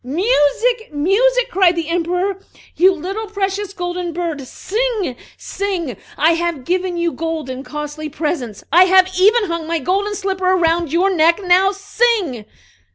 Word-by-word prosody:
"Music! 405 Hz, -, +1 dB
music!" 470 Hz, +12 st, +2 dB
cried 370 Hz, -4 st, +3 dB
the 335 Hz, -2 st, -3 dB
Emperor. 355 Hz, +3 st, -1 dB, 0.4 s
"You 370 Hz, +3 st, +5 dB
little 385 Hz, +5 st, -5 dB
precious 400 Hz, -1 st, -3 dB
golden 355 Hz, -2 st, -4 dB
bird, 330 Hz, -4 st, -3 dB
sing, 430 Hz, -, -2 dB, 0.2 s
sing! 360 Hz, -, -4 dB, 0.2 s
I 315 Hz, +3 st, +4 dB
have 335 Hz, -5 st, -2 dB
given 365 Hz, 0 st, -1 dB
you 340 Hz, 0 st, 0 dB
gold 320 Hz, -5 st, -4 dB
and 260 Hz, +1 st, -6 dB
costly 300 Hz, +1 st, -6 dB
presents; 295 Hz, -, -4 dB
I 360 Hz, +2 st, +7 dB
have 375 Hz, 0 st, +5 dB
even 430 Hz, +5 st, +5 dB
hung 335 Hz, -4 st, -3 dB
my 335 Hz, 0 st, 0 dB
golden 395 Hz, +7 st, -1 dB
slipper 380 Hz, -2 st, 0 dB
around 335 Hz, -3 st, +1 dB
your 365 Hz, +4 st, +2 dB
neck 335 Hz, +1 st, +3 dB
now, 370 Hz, +2 st, +4 dB
sing!" 400 Hz, -, -1 dB
355 Hz, 150 wpm, -18 LUFS, 325-395 Hz, 0.4 s, I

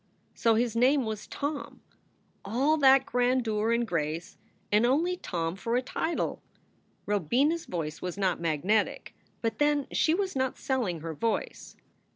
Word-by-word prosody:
So 230 Hz, -1 st, +2 dB
his 230 Hz, 0 st, 0 dB
name 260 Hz, +3 st, +3 dB
was 215 Hz, -1 st, -5 dB
Tom! 290 Hz, 0 st, -5 dB, 0.6 s
All 260 Hz, +10 st, +2 dB
that 270 Hz, -2 st, +6 dB
grandeur 240 Hz, -3 st, +1 dB
and 235 Hz, +1 st, +2 dB
grace, 165 Hz, -3 st, -3 dB, 0.4 s
and 210 Hz, +2 st, +4 dB
only 310 Hz, +9 st, +2 dB
Tom 170 Hz, -, -3 dB
for 230 Hz, +4 st, -2 dB
a 250 Hz, -, +1 dB
title! 320 Hz, +5 st, -2 dB, 0.6 s
Robina 220 Hz, -, +2 dB
s 335 Hz, -, -5 dB
voice 155 Hz, -3 st, -4 dB
was 180 Hz, +1 st, -4 dB
not 190 Hz, -4 st, 0 dB
magnetic. 170 Hz, +7 st, 0 dB, 0.3 s
But 225 Hz, -1 st, -1 dB
then, 295 Hz, -1 st, +2 dB
she 320 Hz, -, +2 dB
was 385 Hz, -2 st, -2 dB
not 260 Hz, -1 st, -1 dB
selling 240 Hz, -, -1 dB
her 165 Hz, 0 st, -5 dB
voice. 225 Hz, +9 st, -3 dB
230 Hz, 150 wpm, -28 LUFS, 190-270 Hz, 0.6 s, that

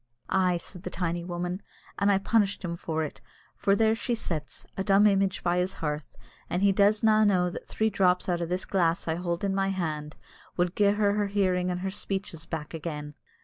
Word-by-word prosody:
"Ay," 185 Hz, -2 st, +3 dB
said 175 Hz, +1 st, -9 dB
the -, -, -5 dB
tiny 175 Hz, -1 st, -2 dB
woman, 175 Hz, +2 st, -3 dB, 0.4 s
"an' 200 Hz, -, +3 dB
I 200 Hz, -, +5 dB
punished 200 Hz, -1 st, +1 dB
him 170 Hz, -1 st, -3 dB
for 160 Hz, -2 st, -2 dB
it, 150 Hz, -, -7 dB, 0.3 s
for 200 Hz, -1 st, +2 dB
there 220 Hz, +1 st, +3 dB
she 235 Hz, +2 st, -1 dB
sits, 150 Hz, -, -4 dB
a 190 Hz, -, -2 dB
dumb 200 Hz, +1 st, +5 dB
image 195 Hz, -2 st, +2 dB
by 175 Hz, 0 st, +2 dB
his 185 Hz, +2 st, 0 dB
hearth; 150 Hz, -2 st, -4 dB, 0.3 s
but 180 Hz, -, -1 dB
he 200 Hz, 0 st, +5 dB
does 205 Hz, +2 st, +3 dB
na' 215 Hz, -1 st, +5 dB
know 180 Hz, -4 st, +3 dB
that -, -, -8 dB
three 220 Hz, 0 st, 0 dB
drops 180 Hz, -2 st, +2 dB
out 175 Hz, -2 st, 0 dB
o' 170 Hz, -, -1 dB
this 180 Hz, +2 st, -2 dB
glass 170 Hz, -4 st, +1 dB
I 160 Hz, -, +1 dB
hold 170 Hz, +1 st, -3 dB
in 195 Hz, -1 st, +1 dB
my 195 Hz, 0 st, +1 dB
hand 155 Hz, -5 st, -3 dB, 0.4 s
wad 175 Hz, 0 st, +1 dB
gie 205 Hz, -, +3 dB
her 205 Hz, -1 st, +2 dB
her 205 Hz, 0 st, +1 dB
hearing 185 Hz, -3 st, +1 dB
and 180 Hz, 0 st, -2 dB
her 190 Hz, 0 st, -2 dB
speeches 195 Hz, -4 st, -4 dB
back 155 Hz, -1 st, -5 dB
again." 150 Hz, -2 st, -5 dB
185 Hz, 215 wpm, -28 LUFS, 170-200 Hz, 0.4 s, I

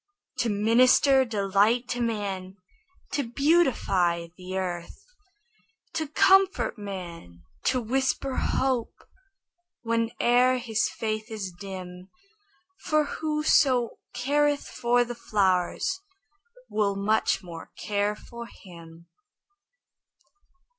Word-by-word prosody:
To 235 Hz, -, +1 dB
minister 250 Hz, +6 st, +4 dB
delight 210 Hz, +2 st, +1 dB
to 245 Hz, -, -2 dB
man, 200 Hz, -5 st, -3 dB, 0.6 s
To 285 Hz, -, 0 dB
beautify 235 Hz, -, +1 dB
the 185 Hz, +1 st, -6 dB
earth; 175 Hz, -2 st, -5 dB, 0.9 s
To 315 Hz, -1 st, -2 dB
comfort 385 Hz, +4 st, +3 dB
man, 175 Hz, -, -8 dB, 0.2 s
to 255 Hz, -, +2 dB
whisper 265 Hz, +2 st, -1 dB
hope 260 Hz, -3 st, 0 dB, 0.9 s
Whene'er 240 Hz, +2 st, +2 dB
his 230 Hz, -2 st, 0 dB
faith 215 Hz, 0 st, -4 dB
is 210 Hz, -4 st, -5 dB
dim; 185 Hz, 0 st, -9 dB, 0.7 s
For 305 Hz, 0 st, +1 dB
Whoso 295 Hz, -5 st, +1 dB, 0.2 s
careth 290 Hz, +3 st, +1 dB
for 245 Hz, +1 st, +1 dB
the 240 Hz, -, -5 dB
flowers 195 Hz, -, 0 dB, 0.7 s
Will 205 Hz, -2 st, 0 dB
much 200 Hz, 0 st, +1 dB
more 170 Hz, -2 st, -9 dB
care 205 Hz, 0 st, -1 dB
for 235 Hz, +2 st, -10 dB
him. 170 Hz, -4 st, -14 dB
225 Hz, 90 wpm, -26 LUFS, 190-255 Hz, 0.9 s, minister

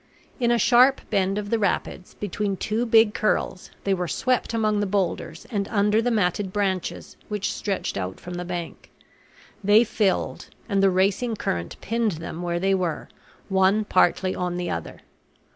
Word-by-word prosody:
In 240 Hz, -2 st, +2 dB
a 240 Hz, -, +4 dB
sharp 250 Hz, +4 st, +5 dB
bend 195 Hz, -1 st, +1 dB
of 205 Hz, -1 st, -4 dB
the 230 Hz, -, +2 dB
rapids, 185 Hz, -2 st, -2 dB
between 205 Hz, 0 st, -2 dB
two 225 Hz, +5 st, -1 dB
big 225 Hz, -2 st, +5 dB
curls, 215 Hz, -4 st, -1 dB
they 195 Hz, -, +1 dB
were 180 Hz, -2 st, -1 dB
swept 255 Hz, +7 st, 0 dB
among 215 Hz, -2 st, +1 dB
the 205 Hz, -, 0 dB
boulders 185 Hz, -4 st, -2 dB
and 200 Hz, -3 st, -1 dB
under 210 Hz, 0 st, +2 dB
the 245 Hz, -, 0 dB
matted 200 Hz, -3 st, 0 dB
branches 190 Hz, -3 st, -2 dB
which 210 Hz, -1 st, -2 dB
stretched 200 Hz, -, -3 dB
out 95 Hz, 0 st, -5 dB
from 180 Hz, -, -8 dB
the 175 Hz, 0 st, -4 dB
bank. 175 Hz, -2 st, -6 dB, 0.7 s
They 205 Hz, +3 st, +6 dB
filled, 215 Hz, -4 st, -1 dB, 0.2 s
and 200 Hz, -3 st, +1 dB
the 195 Hz, -, +5 dB
racing 195 Hz, +5 st, +1 dB
current 85 Hz, -, -3 dB
pinned 230 Hz, -2 st, 0 dB
them 165 Hz, +1 st, -6 dB
where 175 Hz, -1 st, -1 dB
they 195 Hz, +2 st, +2 dB
were, 180 Hz, -4 st, -2 dB, 0.4 s
one 195 Hz, +2 st, +3 dB
partly 185 Hz, -1 st, +2 dB
on 180 Hz, -1 st, -2 dB
the 175 Hz, -1 st, -2 dB
other. 85 Hz, -, -5 dB
200 Hz, 170 wpm, -24 LUFS, 180-215 Hz, 0.7 s, They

